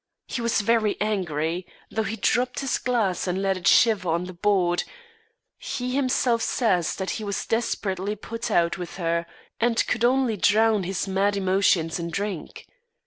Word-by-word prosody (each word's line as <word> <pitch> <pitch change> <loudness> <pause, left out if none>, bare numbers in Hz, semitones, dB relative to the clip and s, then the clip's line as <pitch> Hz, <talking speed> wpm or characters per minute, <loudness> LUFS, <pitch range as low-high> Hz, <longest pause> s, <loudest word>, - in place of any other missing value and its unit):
He 240 - -4
was 235 -2 +1
very 215 -1 +1
angry. 175 -4 -1 0.2
Though 220 - 0
he 220 0 -3
dropped 245 +3 0
his 270 -2 -1
glass, 220 -8 0
and 180 +1 -1
let 195 0 +1
it 180 -2 -3
shiver 210 -6 +4
on 170 +2 +1
the 185 0 -7
board, 180 -1 +1 0.8
he 250 0 -4
himself 255 -3 +1
says 195 -9 +1
that 190 -1 -3
he 220 - -4
was 200 -1 -3
desperately 205 -3 -1
put 230 +3 -5
out 170 +1 +1
with 175 0 -7
her, 170 -1 -1 0.3
and 230 0 +2
could 235 -1 -1
only 250 -2 +2
drown 215 0 +3
his 190 +2 -2
mad 200 +1 +1
emotions 185 -4 +2
in 170 0 -3
drink. 200 -2 -5
200 Hz, 165 wpm, -25 LUFS, 180-230 Hz, 0.8 s, shiver